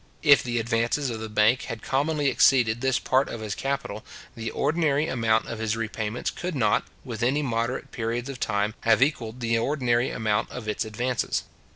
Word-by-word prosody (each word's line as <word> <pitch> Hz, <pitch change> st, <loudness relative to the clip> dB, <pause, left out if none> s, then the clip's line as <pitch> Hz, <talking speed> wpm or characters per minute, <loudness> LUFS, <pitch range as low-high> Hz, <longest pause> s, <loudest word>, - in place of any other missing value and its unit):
If 145 Hz, -2 st, +7 dB
the 120 Hz, -2 st, -2 dB
advances 115 Hz, +4 st, 0 dB
of 110 Hz, -, -5 dB
the 110 Hz, 0 st, -6 dB
bank 105 Hz, +4 st, +3 dB
had 115 Hz, -2 st, -6 dB
commonly 145 Hz, +2 st, 0 dB
exceeded 120 Hz, -4 st, +4 dB
this 130 Hz, -2 st, +2 dB
part 130 Hz, +1 st, +1 dB
of 115 Hz, -, -6 dB
his 105 Hz, -2 st, -3 dB
capital, 135 Hz, -5 st, -3 dB, 0.3 s
the 115 Hz, 0 st, -4 dB
ordinary 150 Hz, 0 st, +1 dB
amount 115 Hz, -3 st, +1 dB
of 115 Hz, -, -5 dB
his 110 Hz, 0 st, -1 dB
repayments 110 Hz, 0 st, -3 dB
could 180 Hz, -2 st, -5 dB
not, 110 Hz, -6 st, +2 dB, 0.2 s
within 130 Hz, +4 st, 0 dB
moderate 115 Hz, 0 st, -2 dB
periods 120 Hz, +1 st, -3 dB
of 135 Hz, -2 st, -6 dB
time, 105 Hz, 0 st, 0 dB
have 115 Hz, +2 st, +4 dB
equalled 125 Hz, -4 st, -2 dB
the 115 Hz, -1 st, +1 dB
ordinary 125 Hz, -2 st, +1 dB
amount 110 Hz, -1 st, 0 dB
of 125 Hz, -3 st, -7 dB
its 105 Hz, +1 st, -1 dB
advances. 120 Hz, +4 st, -1 dB
120 Hz, 180 wpm, -26 LUFS, 110-135 Hz, 0.3 s, If